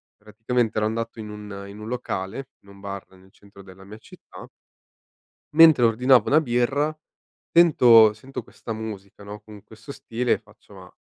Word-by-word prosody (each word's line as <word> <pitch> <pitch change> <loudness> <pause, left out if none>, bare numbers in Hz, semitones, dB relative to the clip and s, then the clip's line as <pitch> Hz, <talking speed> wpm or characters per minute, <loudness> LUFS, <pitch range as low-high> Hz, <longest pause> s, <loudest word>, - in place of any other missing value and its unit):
praticamente 110 +3 -3
ero 105 - +1
andato 115 +1 -4
in 105 -1 -8
un 105 -1 -9
in 100 +1 -12
un 110 - -9
locale, 120 0 -5
in 100 - -21
un 100 0 -16
bar 100 -1 -8
nel 95 0 -21
centro 100 0 -18
della 95 0 -15
mia 105 +2 -12
città 110 - -15 1.0
mentre 160 -5 +6
ordinavo 125 +1 +3
una 155 +2 +4
birra 140 +4 -1 0.5
tento 120 -10 +6
sento 130 +5 -9
questa 115 - -9
musica 105 -2 -9
no? 105 +1 -9
Con 105 -1 -15
questo 110 +5 -13
stile 125 -3 -2
faccio: 105 -1 -22
"Ma, 90 -1 -15
110 Hz, 165 wpm, -23 LUFS, 100-125 Hz, 1.0 s, mentre